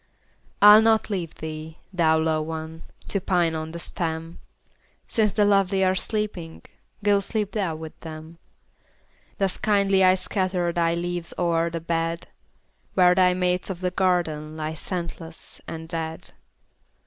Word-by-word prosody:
I'll 210 Hz, +1 st, +10 dB
not 220 Hz, -1 st, +3 dB
leave 175 Hz, -5 st, -3 dB
thee, 155 Hz, +1 st, -7 dB, 0.2 s
thou 160 Hz, -3 st, +3 dB
lone 160 Hz, -1 st, 0 dB
one! 160 Hz, 0 st, -6 dB, 0.3 s
To 200 Hz, -, 0 dB
pine 175 Hz, -3 st, +1 dB
on 160 Hz, 0 st, -4 dB
the 170 Hz, -, -6 dB
stem; 165 Hz, -1 st, -4 dB, 0.7 s
Since 215 Hz, -3 st, +1 dB
the 210 Hz, -1 st, +3 dB
lovely 195 Hz, -1 st, +3 dB
are 185 Hz, 0 st, +3 dB
sleeping, 190 Hz, -4 st, -3 dB, 0.4 s
Go 205 Hz, -1 st, +4 dB
sleep 210 Hz, 0 st, -2 dB
thou 190 Hz, -7 st, -1 dB
with 160 Hz, 0 st, -9 dB
them. 160 Hz, +1 st, -10 dB, 1.0 s
Thus 195 Hz, -2 st, 0 dB
kindly 200 Hz, -2 st, +3 dB
I 185 Hz, 0 st, +6 dB
scatter 185 Hz, -2 st, -1 dB
Thy 170 Hz, -1 st, +1 dB
leaves 175 Hz, 0 st, -3 dB
o'er 170 Hz, -1 st, +1 dB
the 165 Hz, 0 st, -4 dB
bed, 165 Hz, 0 st, -2 dB, 0.7 s
Where 180 Hz, -1 st, +6 dB
thy 180 Hz, 0 st, +4 dB
mates 180 Hz, 0 st, 0 dB
of 185 Hz, -2 st, -5 dB
the 180 Hz, -1 st, 0 dB
garden 165 Hz, -5 st, 0 dB
Lie 155 Hz, 0 st, -3 dB
scentless 170 Hz, -1 st, -6 dB
and 160 Hz, 0 st, -6 dB
dead. 160 Hz, -1 st, -5 dB
175 Hz, 145 wpm, -24 LUFS, 160-190 Hz, 1.0 s, I'll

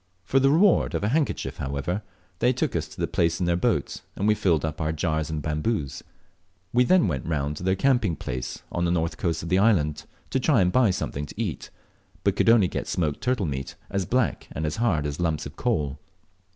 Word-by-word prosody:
For 135 Hz, -, +3 dB
the 135 Hz, +1 st, +4 dB
reward 175 Hz, +6 st, +4 dB
of -, -, -1 dB
a 105 Hz, -, +1 dB
handkerchief, 145 Hz, +2 st, -1 dB
however, 70 Hz, +9 st, -2 dB, 0.4 s
they 125 Hz, -, +4 dB
took 130 Hz, -, -1 dB
us 80 Hz, -2 st, -1 dB
to -, -, -14 dB
the -, -, +1 dB
place 85 Hz, 0 st, 0 dB
in 90 Hz, -, 0 dB
their 85 Hz, 0 st, +2 dB
boat, 85 Hz, -, 0 dB
and 100 Hz, -, -1 dB
we 105 Hz, -, +5 dB
filled 85 Hz, -7 st, +1 dB
up 80 Hz, 0 st, -4 dB
our 80 Hz, 0 st, 0 dB
jars 80 Hz, 0 st, -1 dB
and 75 Hz, -2 st, -3 dB
bamboos. 75 Hz, -, -2 dB, 0.7 s
We 125 Hz, +1 st, +4 dB
then 185 Hz, -, +4 dB
went 65 Hz, -6 st, -3 dB
round 75 Hz, -2 st, -1 dB
to -, -, -7 dB
their 95 Hz, +1 st, +2 dB
camping 120 Hz, -6 st, +2 dB
place 65 Hz, -2 st, -5 dB
on 85 Hz, -, 0 dB
the -, -, +1 dB
north 80 Hz, -2 st, 0 dB
coast 85 Hz, -3 st, -1 dB
of 85 Hz, -, -5 dB
the 90 Hz, +2 st, +3 dB
island 75 Hz, -9 st, +2 dB, 0.3 s
to -, -, +1 dB
try -, -, +3 dB
and 90 Hz, 0 st, +3 dB
buy 125 Hz, -1 st, +4 dB
something 75 Hz, -5 st, -3 dB
to -, -, -11 dB
eat, -, -, -3 dB, 0.5 s
but -, -, +2 dB
could -, -, +3 dB
only 115 Hz, -5 st, +6 dB
get -, -, -4 dB
smoked 75 Hz, -5 st, -1 dB
turtle 125 Hz, -6 st, 0 dB
meat 65 Hz, -3 st, -4 dB, 0.2 s
as 100 Hz, -1 st, -1 dB
black 125 Hz, -1 st, 0 dB
and 80 Hz, -, -3 dB
as 75 Hz, -, -2 dB
hard 95 Hz, -11 st, +1 dB
as 75 Hz, +1 st, -3 dB
lumps 80 Hz, -3 st, 0 dB
of -, -, -8 dB
coal. 75 Hz, -2 st, -1 dB
85 Hz, 225 wpm, -25 LUFS, 75-110 Hz, 0.7 s, only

